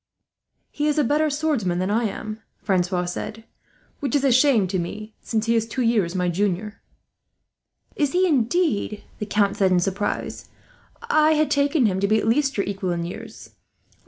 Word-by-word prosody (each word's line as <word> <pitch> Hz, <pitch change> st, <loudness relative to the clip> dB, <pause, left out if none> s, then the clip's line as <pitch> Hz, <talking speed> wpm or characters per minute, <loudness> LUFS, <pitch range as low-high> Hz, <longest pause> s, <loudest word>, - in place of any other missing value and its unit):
"He 295 Hz, 0 st, -1 dB
is 300 Hz, 0 st, +1 dB
a 300 Hz, -, +4 dB
better 300 Hz, +4 st, +2 dB
swordsman 285 Hz, -, 0 dB
than 185 Hz, +2 st, -1 dB
I 230 Hz, +2 st, +1 dB
am," 215 Hz, +1 st, -5 dB, 0.2 s
Francois 180 Hz, -2 st, 0 dB
said; 215 Hz, +5 st, -5 dB, 0.6 s
"which 275 Hz, -3 st, -2 dB
is 280 Hz, -, +2 dB
a 275 Hz, -, +4 dB
shame 255 Hz, -4 st, +4 dB
to 190 Hz, -1 st, -1 dB
me, 215 Hz, +5 st, -6 dB
since 220 Hz, -1 st, -1 dB
he 230 Hz, -, +2 dB
is 225 Hz, 0 st, +1 dB
two 250 Hz, +3 st, -2 dB
years 210 Hz, -7 st, +1 dB
my 180 Hz, -1 st, 0 dB
junior." 200 Hz, +3 st, -2 dB, 1.1 s
"Is 290 Hz, -3 st, 0 dB
he 365 Hz, +1 st, +3 dB
indeed!" 275 Hz, -, 0 dB, 0.2 s
the 210 Hz, -, -4 dB
Count 205 Hz, -1 st, +1 dB
said 190 Hz, -2 st, +3 dB
in 180 Hz, -, +4 dB
surprise. 195 Hz, +3 st, -3 dB, 0.6 s
"I 310 Hz, 0 st, +5 dB
had 310 Hz, 0 st, +1 dB
taken 285 Hz, -1 st, +2 dB
him 190 Hz, -3 st, +1 dB
to 200 Hz, -, +1 dB
be 215 Hz, +2 st, +3 dB
at 220 Hz, -, -1 dB
least 275 Hz, +3 st, +1 dB
your 200 Hz, -, +1 dB
equal 195 Hz, -1 st, -3 dB
in 170 Hz, -1 st, -2 dB
years. 175 Hz, -, -9 dB
220 Hz, 185 wpm, -23 LUFS, 195-280 Hz, 1.1 s, I